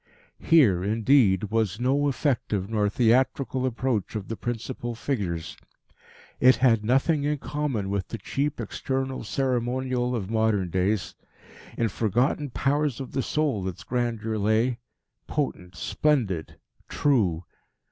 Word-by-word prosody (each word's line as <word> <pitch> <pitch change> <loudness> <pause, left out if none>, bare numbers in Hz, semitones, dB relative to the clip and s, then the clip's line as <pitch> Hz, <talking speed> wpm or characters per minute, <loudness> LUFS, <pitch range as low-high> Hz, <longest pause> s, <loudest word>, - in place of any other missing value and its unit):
Here, 115 - +4
indeed, 105 -2 +3
was 110 -3 0
no 135 +4 +2
effective 120 -7 -1
nor 105 -2 +1
theatrical 130 +3 +2
approach 120 -4 -2
of 105 -3 -5
the 115 - -2
principal 120 +1 -4
figures. 95 - -3 0.8
It 130 +1 +6
had 115 -4 +3
nothing 135 +6 +2
in 150 +1 0
common 140 -9 -2
with 100 -1 -2
the 115 - -5
cheap 140 +8 -2
external 130 +4 -3
ceremonial 125 0 -1
of 100 -5 -3
modern 110 -5 +1
days. 95 +3 0 0.6
In 115 - +2
forgotten 120 +8 0
powers 140 +1 0
of 135 - -6
the 135 - -1
soul 135 -11 -1
its 95 -1 -6
grandeur 115 -3 -2
lay, 110 +4 +1 0.5
potent, 95 -11 -3
splendid, 115 - 0 0.3
true. 100 - +1
120 Hz, 125 wpm, -26 LUFS, 105-135 Hz, 0.8 s, It